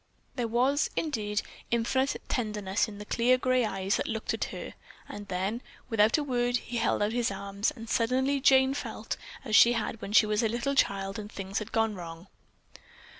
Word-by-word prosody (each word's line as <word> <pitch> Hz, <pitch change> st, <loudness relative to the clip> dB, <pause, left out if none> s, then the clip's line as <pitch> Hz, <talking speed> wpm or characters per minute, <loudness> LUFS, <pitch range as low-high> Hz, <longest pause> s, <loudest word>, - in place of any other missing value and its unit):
There 245 Hz, -3 st, -1 dB
was, 255 Hz, +6 st, +2 dB
indeed, 210 Hz, -9 st, -1 dB, 0.3 s
infinite 260 Hz, +4 st, +1 dB
tenderness 210 Hz, -4 st, -1 dB
in 210 Hz, -2 st, -9 dB
the 210 Hz, -, -8 dB
clear 245 Hz, +4 st, +3 dB
gray 255 Hz, 0 st, +2 dB
eyes 195 Hz, -2 st, 0 dB
that -, -, -2 dB
looked 220 Hz, -1 st, -2 dB
at -, -, -1 dB
her, -, -, -7 dB, 0.3 s
and 205 Hz, 0 st, -8 dB
then, 195 Hz, +5 st, -2 dB, 0.3 s
without 220 Hz, +2 st, +4 dB
a 300 Hz, -, -1 dB
word, 245 Hz, -3 st, +1 dB
he 240 Hz, 0 st, -5 dB
held 230 Hz, -2 st, +1 dB
out 210 Hz, -, 0 dB
his 240 Hz, -1 st, +1 dB
arms, 200 Hz, +1 st, -2 dB
and 225 Hz, 0 st, -9 dB
suddenly 260 Hz, +5 st, +1 dB
Jane 265 Hz, 0 st, +5 dB
felt 285 Hz, -, -4 dB, 0.3 s
as 215 Hz, -, +1 dB
she 240 Hz, -, +8 dB
had 225 Hz, -1 st, -3 dB
when 195 Hz, -, -6 dB
she 215 Hz, 0 st, +6 dB
was 210 Hz, 0 st, +1 dB
a 225 Hz, -, +1 dB
little 240 Hz, +5 st, -1 dB
child, 195 Hz, -6 st, 0 dB
and 210 Hz, 0 st, -8 dB
things 195 Hz, +1 st, -4 dB
had 215 Hz, -, -7 dB
gone 225 Hz, -1 st, +1 dB
wrong. 170 Hz, -2 st, -8 dB
225 Hz, 190 wpm, -29 LUFS, 205-245 Hz, 0.3 s, she